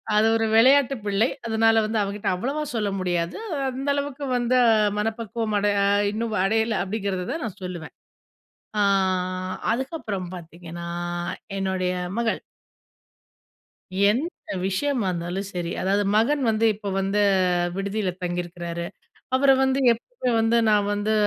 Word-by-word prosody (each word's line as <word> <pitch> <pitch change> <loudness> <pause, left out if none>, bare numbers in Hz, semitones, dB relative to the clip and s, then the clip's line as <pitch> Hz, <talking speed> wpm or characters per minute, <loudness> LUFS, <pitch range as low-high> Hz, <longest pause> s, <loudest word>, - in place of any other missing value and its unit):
அது 210 +1 +5
ஒரு 225 0 +1
விளயாட்டு 270 +3 +5
பிள்ளை. 205 +4 +2 0.2
அதனால 225 0 +3
வந்து 220 +1 -1
அவங்கிட்ட 200 +1 -4
அவ்வளவா 275 +11 -2
சொல்ல 210 -3 0
முடியாது. 175 -2 -1 0.3
அந்த 265 +2 -5
அளவுக்கு 285 0 -3
வந்து 245 +1 +2 0.4
மனப்பக்குவம் 225 0 -2
அடை 205 0 +2 0.4
இன்னும் 220 +1 -2
அடையல. 220 +2 +1
அப்டிங்குறத 195 -2 -3
தான் 315 +2 -3
நான் 210 - -7
சொல்லுவேன். 175 -3 -6 0.8
ஆ, - - +3 0.9
அதுக்கப்புறம் 235 - -3
பாத்தீங்கன்னா 170 0 -9 0.7
என்னுடய 190 -1 -1 0.3
மகள். 230 -1 0 1.7
எந்த 280 - -3 0.2
விஷயமா 235 +3 0
இருந்தாலும் 175 +3 -3
சரி, 175 -2 -3
அதாவது 200 +2 +2
மகன் 275 +7 +3
வந்து 220 +1 +2
இப்ப 205 0 -6
வந்து, 195 +2 0 0.6
விடுதியில 195 0 -1
தங்கியிருக்குறாரு. 175 -1 -4 0.5
அவர 270 +1 +4
வந்து 265 0 +2
எப்பவுமே 250 - -4
வந்து 225 +1 +3
நான் 205 -1 +3
வந்து, 205 +1 0
215 Hz, 120 wpm, -24 LUFS, 190-235 Hz, 1.7 s, அது